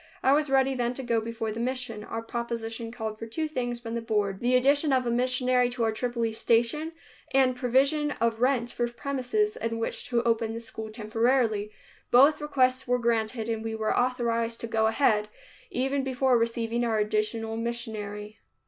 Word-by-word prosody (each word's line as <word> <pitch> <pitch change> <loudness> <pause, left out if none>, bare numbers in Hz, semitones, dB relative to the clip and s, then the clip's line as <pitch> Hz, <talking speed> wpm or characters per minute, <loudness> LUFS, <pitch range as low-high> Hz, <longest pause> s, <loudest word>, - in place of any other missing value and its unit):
I 265 - +5
was 300 0 +2
ready 270 0 +3
then 245 -1 -1
to 265 - -5
go 230 -2 +1
before 225 -1 -4
the 220 - -5
mission. 245 -3 -3
Our 225 +1 -5
proposition 230 0 -4
called 220 -2 -5
for 225 - -6
two 315 +8 -2
things 245 -5 -3
from 230 -1 -6
the 235 - -2
Board, 210 -4 -1
the 245 +1 +2
addition 280 +4 +3
of 260 -1 +2
a 235 - 0
missionary 250 0 +2
to 245 -1 -2
our 225 - +2
Tripoli 235 0 -2
station 235 +9 +1 0.4
and 260 -2 +4
provision 275 +4 +2
of 230 0 0
rent 250 -2 +2
for 240 - -1
premises 280 - -1
in 230 0 -3
which 230 - -3
to 240 -1 +1
open 225 -1 0
the - - -4
school 220 -1 -7
temporarily. 220 0 +1 0.4
Both 280 +5 +6
requests 260 -3 +1
were 250 0 +2
granted 230 -1 0
and 225 -1 -2
we 225 0 -3
were 220 -1 0
authorized 235 -2 0
to 235 - -4
go 220 -1 +2
ahead, 220 -3 +2 0.4
even 270 +2 0
before 260 -1 +2
receiving 230 0 0
our 225 -2 +1
additional 215 +1 -1
missionary. 220 -2 -4
235 Hz, 185 wpm, -27 LUFS, 225-255 Hz, 0.4 s, Both